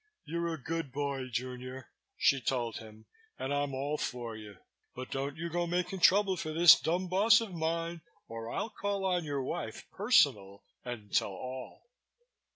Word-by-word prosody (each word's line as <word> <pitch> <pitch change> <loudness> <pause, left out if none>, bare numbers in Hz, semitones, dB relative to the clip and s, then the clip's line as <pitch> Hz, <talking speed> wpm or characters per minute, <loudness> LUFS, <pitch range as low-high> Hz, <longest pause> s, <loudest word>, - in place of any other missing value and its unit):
"You're 170 +2 -2
a 160 - -4
good 165 0 -3
boy, 140 -1 -2
junior," 130 +1 -5 0.3
she 135 -1 +3
told 120 -3 -1
him, 110 0 -12 0.3
"and 135 +2 -2
I'm 145 -1 -1
all 145 +3 -2
for 120 -3 -4
you. 105 -3 -10 0.4
But 130 0 -7
don't 140 +2 -3
you 170 +1 -3
go 175 +1 -1
making 180 +2 -1
trouble 190 +1 +5
for 155 - -4
this 170 +1 +8
dumb 180 +3 -1
boss 210 +5 +5
of 225 -5 -5
mine 165 0 -2 0.3
or 115 0 -6
I'll 225 - -3
call 200 -1 -2
on 180 -2 +1
your 140 -2 -2
wife, 145 -5 -5
personal, 140 - +3 0.2
and 115 -5 -7
Tell 100 - +2
All." 130 +6 -8
145 Hz, 165 wpm, -31 LUFS, 125-175 Hz, 0.4 s, this